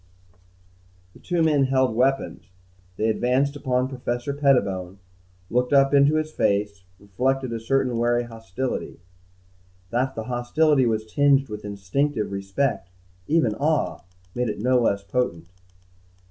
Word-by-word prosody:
The - - -17
two 175 -2 0
men 150 -4 +3
held 130 -2 +1
weapons. 130 -2 0 0.5
They 110 - 0
advanced 125 +5 +1
upon 130 -2 0
Professor 125 0 -3
Pettibone, 100 -10 +1 0.5
looked 125 +5 0
up 135 0 +4
into 140 +2 +5
his 155 0 -1
face, 100 -6 -1
reflected 125 +6 -2
a 115 - -3
certain 130 +2 0
wary 120 +1 +2
hostility. 115 +1 -5 0.9
That 130 +3 0
the 110 - -4
hostility 130 +4 +2
was 110 -1 -1
tinged 140 +2 +2
with 105 0 -7
instinctive 105 +5 -2
respect, 100 +1 -2 0.4
even 150 -9 +2
awe, 150 +7 0 0.3
made 125 -1 -1
it - - -4
no 125 +3 +3
less 100 -4 +1
potent. 90 -7 -2
125 Hz, 130 wpm, -24 LUFS, 110-135 Hz, 0.9 s, into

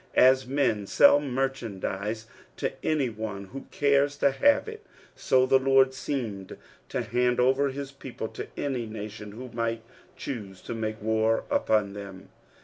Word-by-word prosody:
As 130 0 +6
men 125 -7 0
sell 145 +5 +6
merchandise 115 -6 -3 0.3
to - - -2
any 150 -4 +1
one 105 -2 -5
who 135 +8 -9
cares 140 0 +2
to 140 - +3
have 285 - +3
it, 440 -1 -8 0.3
so 130 -1 +3
the 135 +1 +4
Lord 135 0 +4
seemed 115 -9 -4 0.3
to - - -2
hand 125 +3 +1
over 135 +3 +3
his 140 0 -6
people 130 -4 -7
to - - -7
any 130 -5 -2
nation 105 -1 -7
who 125 +3 -8
might 115 -1 -2 0.3
choose 100 -8 -6
to - - -5
make 110 -1 -3
war 110 +1 +2
upoD 105 -2 +2
them. 100 -1 -9
125 Hz, 150 wpm, -27 LUFS, 110-135 Hz, 0.3 s, As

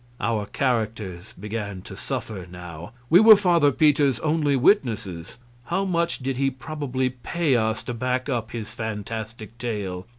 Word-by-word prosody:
Our 105 -3 -1
characters 110 -6 -2
began 105 -2 -5
to 95 - -9
suffer 110 -6 -5
now. 90 +1 -9 0.2
We 175 - +9
were 220 +1 +10
Father 170 -7 +3
Peter's 140 -4 +3
only 150 -2 +1
witnesses; 115 - +1 0.3
how 190 +3 0
much 170 -2 0
did 135 -1 -3
he 135 0 +2
probably 130 -2 -3
pay 140 +3 0
us 110 -1 0
to 120 - -4
back 125 +2 -1
up 120 -5 -2
his 110 -2 -6
fantastic 110 0 -5
tale? 100 -5 -4
120 Hz, 145 wpm, -24 LUFS, 105-140 Hz, 0.3 s, were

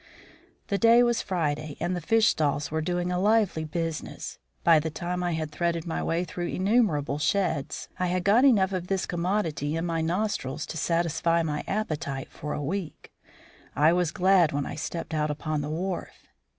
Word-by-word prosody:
The 200 - 0
day 230 +1 +6
was 240 -1 +2
Friday 155 -5 -2
and 175 +3 -1
the 175 - -3
fish 225 +6 +4
stalls 145 -1 0
were 160 0 0
doing 175 +2 -1
a 180 - 0
lively 205 -5 +2
business. 165 0 -4 0.2
By 165 -2 +6
the 160 +1 -2
time 175 +3 -3
I 175 -1 0
had 155 -1 -3
threaded 170 +1 -1
my 165 - -2
way 170 +2 0
through 175 -1 -4
innumerable 185 - +1
sheds, 170 -4 -1
I 180 - +1
had 180 0 0
got 215 +7 +5
enough 200 -8 +4
of 180 -1 -3
this 190 -1 0
commodity 170 -4 -1
into 165 - -1
my 165 -1 -1
nostrils 170 -5 -1
to - - -7
satisfy 170 0 +1
my 150 -2 -2
appetite 150 -10 -3
for 150 - -5
a 150 - -3
week. 175 +2 -5 0.6
I 155 +4 +5
was 180 -2 +1
glad 180 -1 +4
when 145 -1 -1
I - - -5
stepped 160 +2 -5
out 150 -1 0
upon 150 0 -2
the 145 - -4
wharf. 180 +4 -4
170 Hz, 185 wpm, -27 LUFS, 155-185 Hz, 0.6 s, day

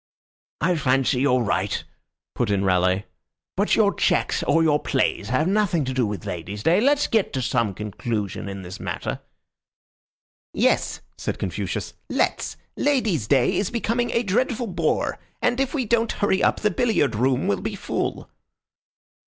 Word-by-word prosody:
"I 170 +3 +2
fancy 135 -2 +2
you're 130 -2 +3
right," 100 -2 -1 0.5
put 120 - -1
in 100 -1 +1
Raleigh. 95 +1 +2 0.5
"But - - +2
your - - +3
checks - - +1
or 165 - +3
your 150 -2 +3
plays 130 -7 0
have 130 +7 +2
nothing 190 -6 +1
to 130 - -2
do 125 -3 +1
with 105 0 -5
ladies' 100 +2 -5
day. 175 +5 +4
Let's 285 +3 +3
get 220 -4 +1
to 130 - -1
some 115 -6 0
conclusion 105 -1 -4
in 100 -1 -6
this 90 +1 -8
matter." - - -4 1.4
"Yes," - - +1 0.2
said - - -3
Confucius. 95 0 -3 0.2
"Let's. - - 0 0.2
Ladies' 220 - +1
day 130 -1 +3
is 195 - 0
becoming 235 0 -1
a 235 - +1
dreadful 240 +4 0
bore, 185 -6 -1 0.2
and 245 +1 +1
if 270 -1 +1
we 260 -4 0
don't 230 +1 +1
hurry 200 -1 +1
up - - +2
the 210 - +2
billiard 190 - +1
room 125 +4 +1
will 100 -2 0
be - - -3
full." - - -3
135 Hz, 160 wpm, -23 LUFS, -, 1.4 s, day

